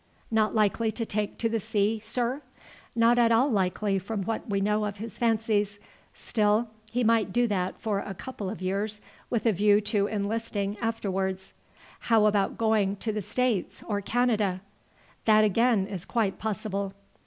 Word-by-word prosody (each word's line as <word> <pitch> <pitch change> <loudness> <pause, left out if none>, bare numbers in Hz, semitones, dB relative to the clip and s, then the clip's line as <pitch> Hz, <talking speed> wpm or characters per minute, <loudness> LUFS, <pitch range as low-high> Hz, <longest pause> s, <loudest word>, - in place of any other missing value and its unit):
"Not 220 -1 +2
likely 220 +1 +2
to 230 +1 -3
take 210 -1 -2
to 230 - 0
the 225 0 0
sea, 215 0 0
sir?" 245 +5 -1 0.5
"Not 235 +1 +4
at 230 -1 +4
all 250 +5 +4
likely 195 0 +1
from 200 +1 -4
what 225 +2 -3
we 200 -1 +1
know 210 +2 +1
of 205 -1 -4
his 225 +1 -8
fancies. 215 -3 +1 0.4
Still 215 +1 +1 0.2
he 245 +1 0
might 225 -3 +3
do 240 +4 +2
that 190 -4 -1
for 210 -3 -1
a 195 -1 -6
couple 210 -3 -6
of 195 -2 -6
years 205 +3 -2 0.3
with 235 -1 -1
a 225 - +5
view 205 +1 +4
to 205 -1 +1
enlisting 205 -1 -2
afterwards." 190 -4 -2 0.6
"How 220 -2 +5
about 205 -2 +2
going 215 -3 +2
to 215 +2 -3
the 210 - -2
States 240 -1 -1
or 205 -2 -1
Canada?" 215 -5 +1 0.6
"That 215 -1 +6
again 215 0 +3
is 195 -4 -6
quite 220 -5 -1
possible." 200 -2 -3
215 Hz, 165 wpm, -27 LUFS, 200-225 Hz, 0.6 s, That